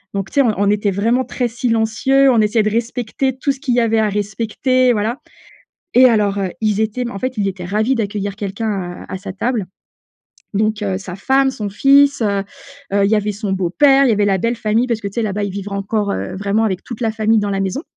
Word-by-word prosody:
donc 195 -1 -3
tu - - -14
sais, 280 - +5
on 235 -5 +2
on 200 +1 +2
était 210 0 +1
vraiment 230 +7 +1
très 250 0 -2
silencieux. 245 +3 +2
On 230 - +3
essayait 215 +1 +2
de 215 - +1
respecter 240 +3 -2
tout 280 - 0
ce 270 - -7
qu'il 260 -4 -1
y 245 - +3
avait 225 -1 +2
à 215 - +2
respecter. 225 +5 0
Voilà 220 +4 -2 0.8
et 255 +1 +8
alors, 210 -4 +1
heu, 190 -2 -1
ils 215 -1 +1
étaient 225 +3 -2
mais 240 - -5
en 195 - -6
fait, 255 0 -4
ils 200 - +1
étaient 185 -2 -6
ravis 215 +8 0
d'accueillir 205 -3 -3
quelqu'un 205 +2 -3 0.4
à - - -9
à 190 - -4
sa 195 0 -7
table. 220 +1 -2 0.9
Donc 215 +1 0
heu, 190 -2 -1
sa 185 -2 -8
femme, 270 +6 +2
son 210 -5 -5
fils, 275 +6 +4
heu 200 -3 0 0.5
heu, 200 0 +3
il - - 0
y - - +4
avait 210 0 -1
son 205 -1 -4
beau 185 -3 -1
père, 275 +8 +5
il 250 - +3
y - - +4
avait 205 0 +2
la 195 -1 +2
belle-famille 230 +2 0
parce 235 -3 -1
que 205 - -6
tu 200 - -15
sais, 235 - -1
là-bas, 205 -1 -2
ils 200 - -3
vivre 200 +1 -6
encore 200 +1 -1
heu, - - -4
vraiment, 200 +3 0
avec 190 -4 -2
toute 235 -2 -8
la 225 -2 +1
famille 220 0 +2
dans 205 -1 -1
la 195 -1 -1
maison 195 +9 -2
215 Hz, 245 wpm, -18 LUFS, 200-240 Hz, 0.9 s, et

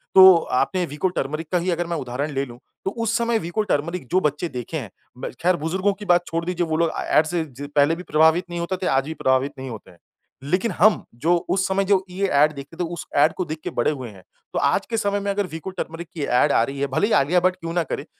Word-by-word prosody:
तो 190 -1 +10 0.3
आपने 185 -2 0
विको 150 +3 -2
टर्मरिक 155 +3 -2
का 180 - +3
ही 180 +1 0
अगर 175 0 -1
मैं 170 -1 -2
उदाहरण 135 +2 -3
ले 135 0 -1
लूँ 120 -2 -12 0.3
तो 195 - 0
उस 230 +1 -1
समय 235 -1 +1
विको 175 +5 -2
टर्मरिक 155 0 -2
जो 185 - +4
बच्चे 150 +5 -5
देखे 125 +4 -5
हैं 120 -9 -6 0.3
म - - -5
ख़ैर 180 +1 +4
बुजुर्गों 185 +5 0
की 205 +2 -10
बात 175 -2 +3
छोड़ 165 0 -2
दीजिए 175 0 -1
वो 160 0 0
लोग 165 -1 +2
ए - - -2
ऐड 155 - +5
से 170 +1 -1 0.3
पहले 145 +3 +4
भी 180 - -8
प्रभावित 160 +2 +3
नहीं 175 0 -4
होते 170 +2 -2
थे, 185 - -2
आज 135 0 +2
भी 160 - -4
प्रभावित 130 -1 +1
नहीं 130 0 -6
होते 110 -4 -9
हैं। 85 - -21 0.4
लेकिन 185 +10 0
हम 205 +4 +4 0.2
जो 170 +6 +3
उस 190 0 +2
समय 195 +1 +1
जो 195 -1 +3
ये 195 +2 -1
ऐड 150 -1 +4
देखते 140 +3 -10
थे - - -1
उस 170 - -6
ऐड 150 +3 +5
को 185 - -3
देख 155 0 -5
के - - -3
बड़े - - +1
हुए 130 -5 -6
हैं। 95 -3 -15 0.3
तो - - 0
आज - - +2
के 230 - -1
समय 205 -2 0
में 200 0 -3
अगर 200 -1 -1
विको 165 +2 -6
टर्मरिक 170 -2 -6
की 155 - -4
ऐड 125 - +3
आ - - +4
रही 135 +3 -4
है 140 - 0
भले 135 +10 +1
ही 225 - 0
आलिया 155 +6 +4
भट 185 0 +2
क्यों 165 -2 -6
ना 175 -1 +1
करे, 145 - -5
170 Hz, 270 wpm, -23 LUFS, 145-185 Hz, 0.4 s, तो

